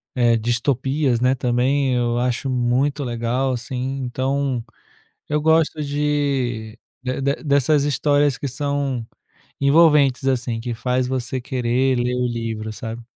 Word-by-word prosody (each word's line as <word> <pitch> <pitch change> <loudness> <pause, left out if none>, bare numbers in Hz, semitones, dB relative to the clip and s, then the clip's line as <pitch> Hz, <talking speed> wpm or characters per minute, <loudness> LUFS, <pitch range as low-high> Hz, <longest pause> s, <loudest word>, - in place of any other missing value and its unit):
eh, 120 -2 +3
distopias, 125 +3 0
né, 130 +2 +3
também 130 +2 +1
eu 120 -1 0
acho 125 +2 -1
muito 130 +4 +1
legal 120 +2 -1
assim, 130 +2 -3
então 130 0 -1 0.7
eu 150 0 +1
gosto 160 0 +2
de 140 -6 -1 0.2
de 130 +1 -2 0.2
dessas 140 0 +3
histórias 145 0 +2
que 140 - -3
são 140 -2 -2 0.5
envolventes 140 -2 +4
assim, 120 -3 -1
que 120 0 -4
faz 125 +2 0
você 130 0 -3
querer 125 0 0
ler 125 +1 0
o 125 0 0
livro, 115 -2 -4
sabe. 115 +2 -6
130 Hz, 130 wpm, -21 LUFS, 120-140 Hz, 0.7 s, envolventes